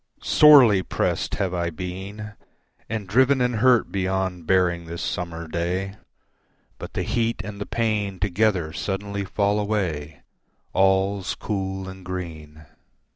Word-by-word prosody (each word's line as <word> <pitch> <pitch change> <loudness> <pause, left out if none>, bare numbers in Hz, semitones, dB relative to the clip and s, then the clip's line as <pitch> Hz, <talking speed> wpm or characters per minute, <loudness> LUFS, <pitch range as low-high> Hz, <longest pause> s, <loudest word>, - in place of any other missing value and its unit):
Sorely 130 -10 +7
pressed - - -1
have 95 -3 -1
I 85 -1 -1
been 95 +5 -7 0.6
And 110 -3 -4
driven 130 +7 +3
and 125 -2 +1
hurt 125 0 +3
beyond 95 -3 -2
bearing 90 -2 +2
this 85 +1 -6
summer 85 -2 -4
day, 90 +4 -2 0.9
But - - -8
the - - -1
heat 115 0 -1
and 100 0 -8
the - - -4
pain 105 -4 -1
together 95 -4 +1
suddenly 100 0 -3
fall 100 +2 0
away, 85 -8 -2 0.5
All's 95 0 +2
cool 95 -2 -4
and 95 0 -10
green. 80 -4 -7
95 Hz, 130 wpm, -24 LUFS, 90-105 Hz, 0.9 s, Sorely